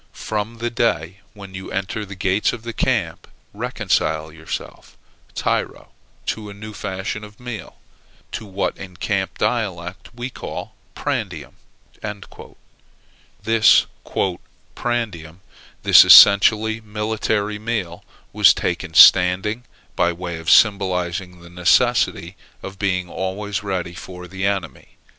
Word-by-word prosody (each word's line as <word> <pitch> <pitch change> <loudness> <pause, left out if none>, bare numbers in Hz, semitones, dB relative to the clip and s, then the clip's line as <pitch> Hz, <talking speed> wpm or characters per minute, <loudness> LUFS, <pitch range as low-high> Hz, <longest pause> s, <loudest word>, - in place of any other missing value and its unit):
From 110 +2 -4
the 120 +1 -3
day 95 -6 -1 0.2
when 100 -2 -11
you 95 0 -8
enter 105 +2 -3
the 100 - -9
gates 95 +2 0
of 115 -2 -8
the 115 0 -6
camp, - - -1 0.3
reconcile 80 0 -1
yourself, 80 0 -8 0.4
tyro, - - -2 0.4
to 105 -2 -4
a 100 - -10
new 110 +1 -9
fashion 95 +2 -5
of 105 0 -13
meal, 120 -4 -8 0.5
to 110 -3 -6
what 95 0 -2
in 95 -2 -10
camp 95 0 -2
dialect 95 -6 -3
we 125 +2 -5
call - - -7 0.2
prandium." - - -4 1.9
This 115 -1 +5 0.9
"prandium," 95 -9 -4 0.4
this - - +8
essentially 110 +2 +7
military 105 -1 -2
meal, 105 -6 -4 0.3
was - - +6
taken - - -3
standing, 95 +6 +6 0.3
by 85 - +2
way 85 -1 -6
of 80 - -4
symbolizing 90 -3 +2
the 85 - -13
necessity 110 +8 +2 0.3
of 95 0 -9
being 95 -3 -1
always 95 +3 -4
ready 95 -4 -3
for 90 0 -10
the 95 +2 -2
enemy. 95 -5 -4
100 Hz, 120 wpm, -21 LUFS, 90-110 Hz, 1.9 s, this